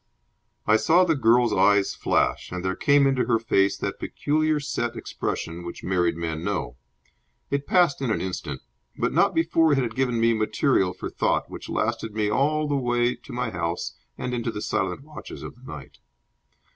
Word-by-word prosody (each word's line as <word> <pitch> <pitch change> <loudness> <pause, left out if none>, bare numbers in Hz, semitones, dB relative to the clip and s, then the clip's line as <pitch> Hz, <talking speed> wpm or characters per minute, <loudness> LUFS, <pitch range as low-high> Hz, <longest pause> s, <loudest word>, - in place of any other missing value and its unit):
I 110 - +5
saw 165 +11 +4
the 165 - +3
girl's 120 -4 +3
eyes 100 +1 +3
flash, - - 0
and 90 0 -4
there 95 0 0
came 140 -1 +4
into 135 -2 +2
her 115 -3 +3
face 100 -4 +2
that - - -4
peculiar 155 +1 0
set 120 -4 -3
expression 85 -5 -4
which 85 - -8
married 90 -3 +1
men 80 -1 -3
know. - - -2 0.8
It 140 0 -1
passed 175 -7 +3
in 130 - -1
an 110 - +1
instant, 85 -7 -5 0.3
but - - 0
not - - +3
before 165 -1 +3
it - - +2
had 120 -4 -1
given 125 -2 0
me 115 0 +4
material 110 -2 +1
for 90 - -6
thought - - 0
which - - -8
lasted 110 -2 -2
me 105 -1 0
all 150 +6 +1
the 145 - 0
way 120 -2 +1
to - - -14
my 125 -2 -2
house 85 -1 -3 0.2
and 125 - -4
into 120 -1 -2
the 105 - -4
silent - - -2
watches 150 +1 -10
of - - -7
the 125 +2 -12
night. 75 -4 -10
120 Hz, 185 wpm, -25 LUFS, 95-140 Hz, 0.8 s, I